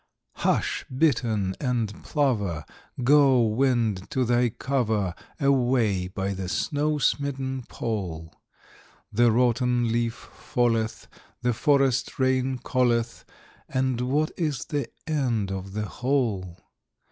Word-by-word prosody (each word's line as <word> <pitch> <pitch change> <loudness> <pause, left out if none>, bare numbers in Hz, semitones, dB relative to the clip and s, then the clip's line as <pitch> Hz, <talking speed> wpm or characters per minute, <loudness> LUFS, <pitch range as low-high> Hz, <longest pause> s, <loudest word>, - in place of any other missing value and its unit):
Hush, - - 0
bittern 115 -9 +1
and 120 -6 -2
plover! 105 - 0 0.4
Go, 135 -2 +5
wind, 115 -4 +1
to 130 -1 0
thy 120 +1 +3
cover 110 -6 -1 0.3
Away 125 - +2
by 95 +1 -3
the 95 -1 -5
snow 150 +7 0
smitten 135 -3 -1
Pole! 90 -8 -4 0.8
The 120 +2 +4
rotten 120 0 +2
leaf 115 0 0
falleth, 115 -2 -2 0.4
the 125 0 +2
forest 135 0 +2
rain 130 0 +1
calleth; 120 -3 0 0.4
And 130 -2 0
what 145 +5 +1
is 150 -7 -1
the 145 -2 -2 0.2
end 120 -10 0
of 95 0 -5
the 105 0 -2
whole? 110 -9 -1
120 Hz, 110 wpm, -26 LUFS, 110-130 Hz, 0.8 s, Go